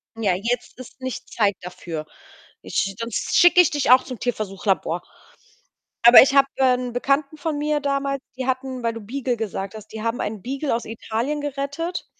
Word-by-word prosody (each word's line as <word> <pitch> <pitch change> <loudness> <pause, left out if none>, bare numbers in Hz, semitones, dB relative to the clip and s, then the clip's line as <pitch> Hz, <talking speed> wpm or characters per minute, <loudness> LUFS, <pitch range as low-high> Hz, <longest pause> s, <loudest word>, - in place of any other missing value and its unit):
„Ja, 210 -5 +1
jetzt 230 +6 -3
ist 255 +1 -12
nicht 260 -1 -6
Zeit 205 -3 +1
dafür. 170 -3 -7 0.6
Ich 195 0 -1
sonst 230 -1 -1
schicke 350 +1 +7
ich 350 - +3
dich 290 -4 -1
auch 255 0 +7
zum 255 -4 -8
Tierversuch-Labor.“ 195 -7 -1 1.0
Aber 240 +1 +11
ich 270 +1 +3
habe, 275 0 +6
äh, 260 -1 +4
'n 250 -1 -4
Bekannten 275 +4 0
von 305 0 -3
mir 300 0 0
damals, 275 -1 -1 0.2
die 260 - -3
hatten 260 -1 -2
weil 230 -1 0
du 230 - -8
Beagle 245 +2 -3
gesagt 200 -2 -4
hast, 215 0 -10
die 220 0 -8
haben 230 +1 -1
einen 210 -1 -4
Beagle 270 +5 -2
aus 235 - -4
Italien 230 +6 -3
gerettet. 285 +5 -4
250 Hz, 180 wpm, -22 LUFS, 220-275 Hz, 1.0 s, Aber